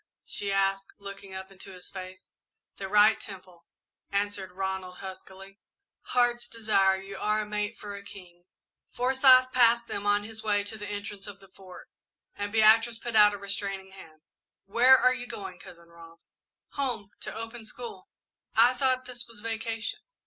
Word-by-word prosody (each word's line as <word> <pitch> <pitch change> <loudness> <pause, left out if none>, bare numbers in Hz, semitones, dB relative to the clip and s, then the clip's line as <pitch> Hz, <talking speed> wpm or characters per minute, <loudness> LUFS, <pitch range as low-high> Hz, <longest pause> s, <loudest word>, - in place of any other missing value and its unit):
she 200 -1 -3
asked, 195 0 +1
looking 200 -1 -9
up 190 0 -7
into 195 0 -11
his 180 -1 -13
face. 185 -1 -10 0.5
"The 195 - -5
right 210 +2 +5
temple," 185 -4 -12 0.4
answered 200 -1 -2
Ronald, 190 -1 -4
huskily. 195 +1 -10 0.5
"Heart's 240 -1 +1
Desire, 195 -5 +2
you 195 0 -9
are 210 +1 +1
a - - -4
mate 210 +1 -3
for 205 -1 -8
a 200 - -8
king!" 175 -3 -13 0.4
Forsyth 255 0 +5
passed 235 -2 +4
them 205 0 -3
on 205 0 +3
his 220 +1 -5
way 205 -2 +1
to 205 +2 -7
the 205 -1 -7
entrance 205 -1 -6
of 200 -1 -9
the 195 - -18
Fort, 185 -1 -13 0.5
and 205 0 -4
Beatrice 225 +1 +5
put 235 0 -5
out 210 -1 +7
a - - -6
restraining 195 -1 -4
hand. 160 -5 -14 0.4
"Where 245 +6 +6
are 255 - +4
you 245 -1 -6
going, 190 -5 -7
Cousin 170 -1 -14
Rob?" 165 0 -15 0.5
"Home 245 -8 -3
to - - -7
open 225 +1 -7
school." 220 -4 -9 0.5
"I 235 +3 +6
thought 255 0 +1
this 245 -1 -6
was 230 -2 -11
vacation?" 225 - -3
205 Hz, 165 wpm, -28 LUFS, 195-230 Hz, 0.5 s, out